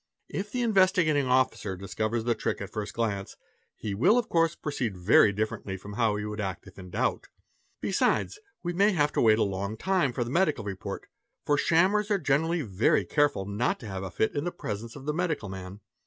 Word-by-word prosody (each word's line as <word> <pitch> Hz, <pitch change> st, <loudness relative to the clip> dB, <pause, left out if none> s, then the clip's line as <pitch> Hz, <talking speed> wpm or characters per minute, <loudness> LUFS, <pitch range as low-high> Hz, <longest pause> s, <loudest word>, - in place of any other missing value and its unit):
If 205 Hz, +1 st, -4 dB
the 250 Hz, -1 st, -1 dB
Investigating 185 Hz, -, +3 dB
Officer 125 Hz, -6 st, +1 dB
discovers 110 Hz, +4 st, -2 dB
the 120 Hz, 0 st, +2 dB
'trick 110 Hz, -, -2 dB
at 100 Hz, -, -6 dB
the -, -, -32 dB
first 105 Hz, 0 st, -4 dB
glance, 100 Hz, -4 st, -2 dB, 0.4 s
he 105 Hz, -2 st, -4 dB
will 135 Hz, -, +4 dB
of 240 Hz, -, 0 dB
course 165 Hz, -1 st, +2 dB
proceed 120 Hz, -9 st, -3 dB
very 100 Hz, +3 st, +5 dB
differently 105 Hz, -2 st, -3 dB
from 100 Hz, +2 st, -10 dB
how 110 Hz, -1 st, +1 dB
he 105 Hz, 0 st, -3 dB
would 105 Hz, 0 st, -4 dB
act 95 Hz, -2 st, -4 dB
if -, -, -14 dB
in 90 Hz, -1 st, -10 dB
doubt. 110 Hz, +8 st, -1 dB, 0.5 s
Besides, 420 Hz, -, +1 dB, 0.2 s
we 175 Hz, 0 st, -2 dB
may 200 Hz, +4 st, +3 dB
have 150 Hz, -4 st, +2 dB
to -, -, +1 dB
wait 110 Hz, -2 st, +5 dB
a -, -, +3 dB
long 100 Hz, +2 st, -3 dB
time 185 Hz, -, +1 dB
for 120 Hz, 0 st, -1 dB
the 120 Hz, -, -6 dB
medical 155 Hz, -, +1 dB
report; 95 Hz, -2 st, -5 dB, 0.4 s
for 145 Hz, -, +3 dB
shammers 190 Hz, +8 st, +3 dB
are 205 Hz, -, +3 dB
generally 160 Hz, +1 st, +1 dB
very 100 Hz, -1 st, +2 dB
careful 145 Hz, -10 st, +1 dB
not 100 Hz, +5 st, -1 dB
to -, -, -8 dB
have 95 Hz, -2 st, -5 dB
a 95 Hz, -, -4 dB
fit 100 Hz, +5 st, 0 dB
in 155 Hz, +5 st, -1 dB
presence 110 Hz, +3 st, -5 dB
of 140 Hz, -1 st, -10 dB
the 150 Hz, -, -1 dB
medical 160 Hz, -, -1 dB
man. 95 Hz, +1 st, -8 dB
115 Hz, 210 wpm, -28 LUFS, 100-165 Hz, 0.5 s, very